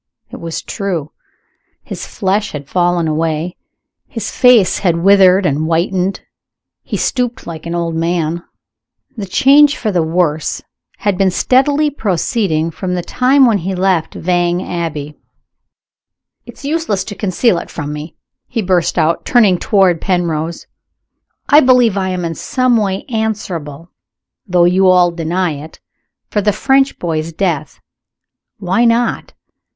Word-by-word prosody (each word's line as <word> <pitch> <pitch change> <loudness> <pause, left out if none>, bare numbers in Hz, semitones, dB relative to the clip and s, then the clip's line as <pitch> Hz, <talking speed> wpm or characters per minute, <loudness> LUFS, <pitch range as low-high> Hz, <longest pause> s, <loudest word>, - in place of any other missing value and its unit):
It - - -9
was 165 -1 -5
true. 180 -8 -4 0.7
His - - -7
flesh 200 +1 -1
had 145 -2 -7
fallen 175 0 +1
away; 160 +2 -2 0.5
his 230 -5 -5
face 250 -7 +4
had 170 -3 0
withered 195 -1 +5
and 150 0 0
whitened; 180 +3 -1 0.6
he - - -4
stooped 250 -1 -2
like 165 -1 -8
an 170 - -3
old 170 -1 -2
man. 165 0 -1 0.7
The 205 -4 -6
change 285 +7 +4
for 215 - -2
the 180 -3 +1
worse 160 -1 -1 0.4
had 205 -4 -1
been 195 -1 +3
steadily 285 +9 +2
proceeding 180 - -1
from 180 +2 -4
the 175 - -3
time 260 +6 +3
when 225 -4 +2
he 190 +2 -3
left 180 -3 0
Vange 175 0 0
Abbey. 155 -4 -5 1.3
"It's - - -12
useless 285 - -1
to 205 - -7
conceal 195 0 +1
it - - -10
from 145 -2 -5
me!" 150 +2 -8 0.3
he 230 -3 -3
burst 180 -2 0
out, 165 0 +1
turning 210 -8 +3
toward 190 -5 +2
Penrose. 170 -3 -2 0.8
"I 290 - +7
believe 250 -6 +4
I 190 -1 -1
am 180 -1 -3
in 165 - -3
some 255 - 0
way 195 -3 -1
answerable 180 - -4 0.6
though 175 -2 +3
you 185 +2 +3
all 180 -1 +4
deny 170 +1 -1
it 160 - -13 0.5
for 210 - 0
the 210 +1 +2
French 270 +5 +1
boy's 165 -1 -3
death. 165 -4 -3 0.8
Why 190 +4 0
not? 235 0 0
180 Hz, 140 wpm, -15 LUFS, 165-215 Hz, 1.3 s, I